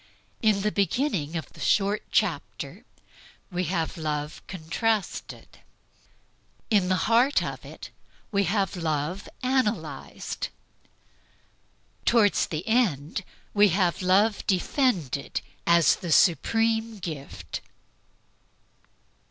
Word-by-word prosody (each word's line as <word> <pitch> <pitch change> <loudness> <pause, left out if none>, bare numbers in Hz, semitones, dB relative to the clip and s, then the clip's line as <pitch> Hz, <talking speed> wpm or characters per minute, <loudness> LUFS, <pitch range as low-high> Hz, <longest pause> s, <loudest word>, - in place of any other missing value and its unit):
In 215 -4 +3
the 210 - +1
beginning 200 - 0
of 160 - -7
the - - -15
short 205 +1 +2
chapter - - -1 0.7
we 180 0 -1
have 165 -1 -2
Love 150 -1 -3
contrasted; 190 +4 -3 1.1
in 195 -4 +3
the 185 - +3
heart 240 +5 +4
of - - -5
it, - - -10 0.4
we 200 -1 +2
have 195 -1 0
Love 160 +2 -2
analyzed; 255 -4 -1 1.6
toward 220 -4 +4
the 160 +4 -1
end, 195 - +1 0.3
we 205 0 +6
have 180 -1 +1
Love 195 +4 +3
defended 185 - 0 0.3
as 170 -1 +5
the 175 -4 -5
supreme 225 +7 +3
gift. 155 -7 -6
195 Hz, 95 wpm, -26 LUFS, 165-220 Hz, 1.6 s, we